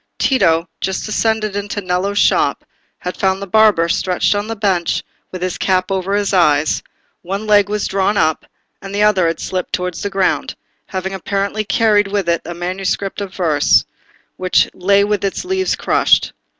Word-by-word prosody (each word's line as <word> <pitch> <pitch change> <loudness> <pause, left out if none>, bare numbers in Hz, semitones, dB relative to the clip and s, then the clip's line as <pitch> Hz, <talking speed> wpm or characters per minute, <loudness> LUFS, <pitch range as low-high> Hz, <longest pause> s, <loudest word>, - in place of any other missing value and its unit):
Tito, 170 -10 +2
just 190 0 -2
descended 215 -1 0
into 205 0 -3
Nello's 190 +1 -1
shop, - - +2 0.3
had 180 - -5
found 190 0 0
the 200 - -5
barber 205 -4 +4
stretched 180 +3 +1
on 205 +1 -2
the 225 - -4
bench 195 -5 0 0.3
with 185 -1 -6
his 185 -1 -3
cap 185 0 +1
over 195 +1 -1
his 205 -1 0
eyes; 155 -4 +3 0.4
one 195 +4 -4
leg 205 -1 +4
was 210 -1 -1
drawn 195 +2 0
up, 155 -3 +1 0.4
and 195 0 -7
the 205 - +2
other 190 -5 +3
had 165 -1 -2
slipped 185 -2 -4
towards 180 -3 -2
the 205 - -2
ground, 195 -1 0 0.3
having 190 0 -4
apparently 200 +3 -2
carried 210 -1 +2
with 195 -2 -2
it 170 0 +1
a 170 +1 -6
manuscript 185 +3 -3
volume 200 -1 -4
of 185 - -18
verse, 155 -6 +3 0.5
which 185 -1 +2
lay 200 +2 +3
with 205 -1 -1
its 195 - -2
leaves 380 0 0
crushed. - - +2
195 Hz, 175 wpm, -17 LUFS, 180-205 Hz, 0.5 s, barber